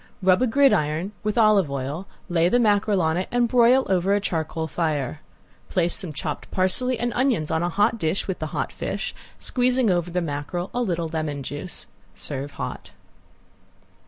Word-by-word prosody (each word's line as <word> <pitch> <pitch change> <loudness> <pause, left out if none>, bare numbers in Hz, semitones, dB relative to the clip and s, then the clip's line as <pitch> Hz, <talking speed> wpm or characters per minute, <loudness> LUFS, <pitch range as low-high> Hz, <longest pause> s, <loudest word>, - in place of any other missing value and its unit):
Rub 185 +2 +4
a 255 - +3
gridiron 195 - +2
with 210 +1 -2
olive 215 -7 +5
oil, 140 +7 -4 0.2
lay 175 -1 +2
the 245 - +3
mackerel 205 -4 +3
on 160 +1 +1
it 185 - -2
and 245 0 +2
broil 250 +2 +5
over 190 +1 +2
a - - +2
charcoal 160 -4 -2
fire. 155 -3 -2 0.5
Place 175 -2 +1
some 180 - -3
chopped 150 0 -5
parsley 235 +7 +2
and 240 +1 -1
onions 245 - +1
on 160 0 +1
a 175 - 0
hot 210 +5 +2
dish, 160 +2 -1
with 190 - -3
the 155 - -3
hot - - -3
fish, - - -4 0.2
squeezing 250 -3 +1
over 175 -1 0
the 180 +1 -1
mackerel 170 +3 -4
a 245 - 0
little 175 -7 -1
lemon 155 -3 -3
juice. 145 +7 -5 0.3
Serve 140 0 -5
hot. - - -6
180 Hz, 175 wpm, -24 LUFS, 160-220 Hz, 0.5 s, olive